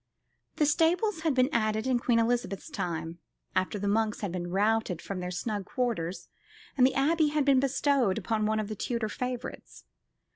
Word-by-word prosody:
The 300 - +2
stables 335 +6 +2
had 315 -4 0
been 255 +2 +3
added 215 0 +1
in 255 -2 +2
Queen 240 -1 +2
Elizabeth's 230 - 0
time, 170 - -4 0.4
after 185 +2 0
the 205 0 -2
monks 215 +1 +1
had 200 -4 -2
been 175 -1 -4
routed 205 -1 +1
from 195 -2 -5
their 180 0 -4
snug 200 +2 -3
quarters, 225 - -2 0.5
and 255 -2 +6
the 265 - -3
Abbey 310 +3 +3
had 295 -1 +1
been 275 -2 +5
bestowed 270 -5 +2
upon 215 -2 0
one 215 0 +1
of 215 - -2
the 215 - -5
Tudor 230 +1 -2
favourites. 250 +2 -6
225 Hz, 180 wpm, -29 LUFS, 200-270 Hz, 0.5 s, and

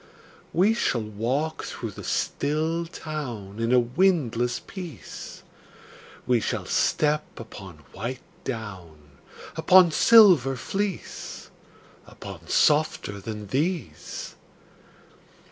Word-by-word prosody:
We 195 +6 +4
shall 125 - 0
walk 125 +9 -2
through - - -5
the - - -10
still 160 +4 -1
town 120 - -6
In 115 +1 0
a 125 - +6
windless 125 -3 +1
peace; 170 - -9 0.8
We 125 -2 +3
shall - - -2
step 150 0 +1
upon 95 -8 -10
white 125 +1 -5 0.2
down, 85 - -7 0.4
Upon 175 +2 +6
silver 180 - +7
fleece, 195 - -4 0.6
Upon - - -10
softer 150 -9 +2
than 105 0 -6
these. 145 - -3
130 Hz, 95 wpm, -25 LUFS, 110-160 Hz, 0.8 s, silver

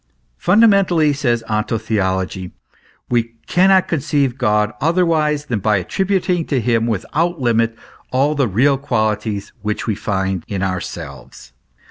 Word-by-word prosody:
" - - -44
Fundamentally," 185 -7 +4
says 120 -5 0
onto 110 +1 -1
theology, 95 -4 -2 0.5
"we 115 -1 -1
cannot 190 +1 +4
conceive 140 -4 0
God 105 -4 +1
otherwise 155 -2 +1
than 115 -7 -2
by 105 +1 +2
attributing 180 - 0
to 135 - 0
him 115 0 +1
without 160 - -1
limit 115 -2 +1 0.3
all 135 +4 +2
the 140 -4 +1
real 130 +7 +2
qualities 110 -5 -2
which 105 +1 -3
we 110 - 0
find 95 -3 -2
in 95 -2 -3
ourselves." 95 -8 -6
120 Hz, 130 wpm, -18 LUFS, 105-150 Hz, 0.5 s, Fundamentally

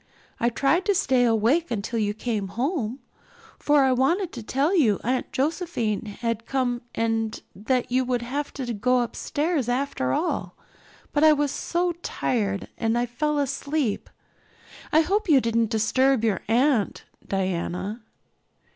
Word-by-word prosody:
I 235 - +2
tried 280 +9 +2
to 405 -2 +2
stay 260 -9 +3
awake 235 +9 +2
until 230 0 -2
you 210 -1 0
came 220 -3 -2
home, 250 - -2 0.6
for 290 -1 +4
I 265 - +3
wanted 325 +9 +1
to 240 - -6
tell 275 - +1
you 230 - +3
Aunt 250 +2 -1
Josephine 270 - -1
had 230 -1 -2
come 250 -3 0
and 225 -1 -1 0.2
that 245 +5 -1
you 260 +1 +3
would 245 -1 -1
have 280 +4 -3
to 250 -4 -4
go 250 +4 +2
upstairs 285 +3 -1
after 245 - -1
all, 345 - -1 0.6
but 295 - +2
I 310 -1 +8
was 290 -2 0
so 350 +3 -1
tired 200 - -1
I 235 +1 +1
fell 295 +5 -1
asleep. 280 -3 -1 0.8
I 315 - +6
hope 395 +4 0
you 285 -4 +7
didn't 230 -2 +1
disturb 245 +3 +2
your 205 -5 +1
aunt, 240 -1 +2 0.2
Diana." 190 +3 -2
250 Hz, 145 wpm, -25 LUFS, 225-290 Hz, 0.8 s, I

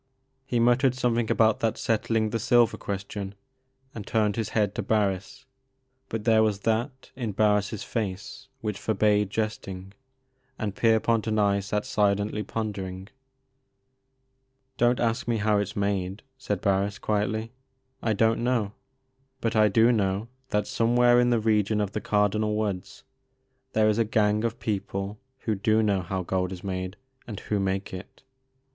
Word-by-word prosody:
He 120 - 0
muttered 125 +2 +3
something 120 -3 0
about 110 -1 +3
that 115 -1 0
settling 110 -1 0
the 115 - -1
silver 120 -1 +4
question, 100 0 -5 0.6
and 105 -3 -8
turned 105 -2 +1
his 115 -2 -2
head 105 -3 +1
to - - -2
Barris, 100 -3 -1 0.6
but 115 -1 -3
there 110 -1 +4
was 105 -2 +1
that 120 +5 -2
in 120 -5 -3
Barris' 105 0 +1
face 100 -4 -4
which 105 -3 -3
forbade 105 -1 +2
jesting, 100 -3 -4 0.6
and 105 -3 -3
Pier 115 -1 +4
pont 115 0 0
and 110 -1 +1
I 100 -1 +3
sat 105 +1 -2
silently 105 +1 +1
pondering. 100 -3 -5 1.7
Don't 120 +1 +3
ask 115 -1 0
me 120 -1 +1
how 105 -1 +2
it 100 - +1
's - - -9
made," 100 -1 -2
said 105 -8 -3
Barris, 100 +1 +1
quietly; 110 +2 -1 0.5
I 110 - +1
don't 115 +2 +2
know. 115 -5 0 0.7
But 115 -1 -1
I 110 -1 +5
do 115 +4 +4
know 100 0 0 0.2
that 105 -3 0
somewhere 120 +2 +3
in 120 0 +3
the 120 -2 +3
region 110 -1 +2
of 105 -2 -1
the 105 - -3
Cardinal 105 +1 +1
Woods 100 -4 -3 0.7
there 110 0 +3
is 110 +1 +2
a - - +5
gang 105 0 +1
of 115 0 -2
people 100 0 -3 0.2
who 110 - -1
do 110 +2 +2
know 100 -3 +1
how 95 +1 -3
gold 90 0 -1
is 90 -1 -7
made, 95 0 -4 0.3
and 105 -4 -6
who 105 - -1
make 95 0 -2
it. 95 +7 -9
105 Hz, 160 wpm, -26 LUFS, 100-115 Hz, 1.7 s, I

